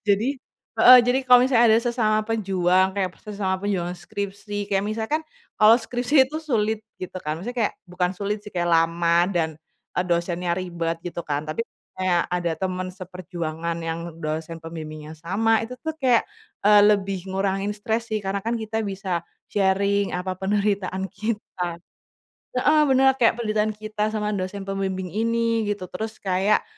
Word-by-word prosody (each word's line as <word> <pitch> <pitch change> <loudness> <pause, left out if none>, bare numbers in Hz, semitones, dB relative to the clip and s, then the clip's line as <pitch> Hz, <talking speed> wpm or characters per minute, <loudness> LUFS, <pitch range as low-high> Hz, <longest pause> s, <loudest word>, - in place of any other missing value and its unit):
Jadi 225 +8 +2 0.4
heeh, 250 0 +10
jadi 245 +2 +2
kalau 250 -1 +8
misalnya 250 -2 +4
ada 220 0 +6
sesama 220 -3 +1
pejuang, 190 -4 +2
kayak 190 -2 0
sesama 200 -3 -2
perjuangan 185 -3 -1
skripsi, 205 0 -5
kayak 195 -1 +2
misalkan, 220 +8 -1 0.4
kalau 215 +1 +8
skripsi 245 +4 +2
itu 310 - -3
sulit, 220 -9 0 0.2
gitu 185 0 -6
kan? 155 -3 -3
Misalnya 245 +4 -5
kayak 215 - +1 0.2
bukan 180 +1 -1
sulit 205 +3 -2
sih, 210 -1 -12
kayak 175 -1 0
lama 170 +1 +3
dan, 170 -4 0 0.5
eee, 180 - +2
dosennya 175 0 0
ribet, 170 -2 -3
gitu 175 -1 -5
kan? 145 0 -1
Tapi 155 +10 -3 0.3
kayak, 180 -2 +2
ada 175 -1 0
teman 185 -1 -2
seperjuangan 175 -3 -5
yang 165 0 -4
dosen 160 +2 -3
pembimbingnya 155 -2 -7
sama. 215 +7 +2
Itu 230 +3 -5
tuh 315 - -1
kayak, 250 -4 +4 0.4
eee, 210 0 +7
lebih 195 -2 +2
ngurangin 195 +1 -1
stres, 225 +2 -2
sih. 215 -1 -2
Karena 195 0 -1
kan 230 +4 -2
kita 220 0 -3
bisa 190 -3 -2 0.3
sharing, 200 0 +2
apa 185 +1 -3
penderitaan 195 -1 -1
kita. 205 -6 -3 0.8
Heeh, 300 +5 +4
benar. 265 -1 +4
Kayak 235 -1 +3
penderitaan 215 -1 0
kita 215 0 -3
sama 210 -1 -1
dosen 190 +1 -4
pembimbing 190 -1 -2
ini, 230 +2 +1
gitu. 185 -3 -6
Terus 220 +3 -5
kayak, 195 +2 +2
200 Hz, 155 wpm, -24 LUFS, 180-220 Hz, 0.8 s, heeh